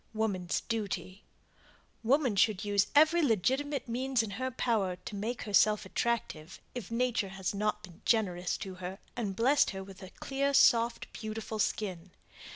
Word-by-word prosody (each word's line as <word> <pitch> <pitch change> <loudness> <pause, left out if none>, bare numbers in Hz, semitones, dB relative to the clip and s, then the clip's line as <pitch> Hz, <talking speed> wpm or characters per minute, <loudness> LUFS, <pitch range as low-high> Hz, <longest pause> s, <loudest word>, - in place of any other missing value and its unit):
WOMAN'S 195 -5 -1
DUTY 205 -3 -4 0.8
Woman 255 -1 +2
should 210 0 +2
use 205 0 +2
every 315 +3 +6
legitimate 270 - +1
means 250 +1 0
in 215 - -5
her 260 +6 -2
power 220 -7 0
to 205 - -9
make 225 +5 -3
herself 210 0 +3
attractive 190 -8 -2
if 245 -6 -6
nature 230 -3 0
has 190 0 -3
not 210 +1 -1
been 175 -3 -13
generous 185 -6 +1
to 195 -1 -6
her 185 +2 -5 0.2
and 210 -5 -3
blessed 270 +7 +4
her 190 -1 -5
with 190 0 -12
a 185 - -9
clear, 280 +6 -1
soft, 235 -1 +4
beautiful 220 0 -5
skin. 190 -4 -2
215 Hz, 155 wpm, -31 LUFS, 195-245 Hz, 0.8 s, every